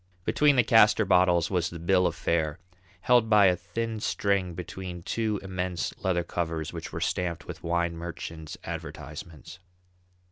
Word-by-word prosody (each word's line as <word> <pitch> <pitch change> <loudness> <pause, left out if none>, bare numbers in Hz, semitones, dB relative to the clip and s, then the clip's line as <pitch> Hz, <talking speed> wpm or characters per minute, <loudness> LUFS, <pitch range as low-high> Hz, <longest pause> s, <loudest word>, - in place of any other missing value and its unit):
Between 150 -1 +4
the 125 - +5
castor 110 -1 +5
bottles 90 -2 +3
was 90 -3 +1
the 85 - -8
bill 90 +2 +3
of - - -3
fare, 80 -1 0 0.4
held 120 -3 +4
by 105 -2 +6
a 90 -1 +5
thin 110 +5 -4
string 100 -4 0
between 90 0 -7
two 110 -1 -1
immense 90 -2 -3
leather 90 -2 0
covers 80 -2 -3
which 80 -1 -6
were 80 - -4
stamped 90 -1 -2
with 90 -1 -8
wine 85 0 0
merchants' 85 -2 -7
advertisements. 85 +2 -8
90 Hz, 150 wpm, -27 LUFS, 85-100 Hz, 0.4 s, by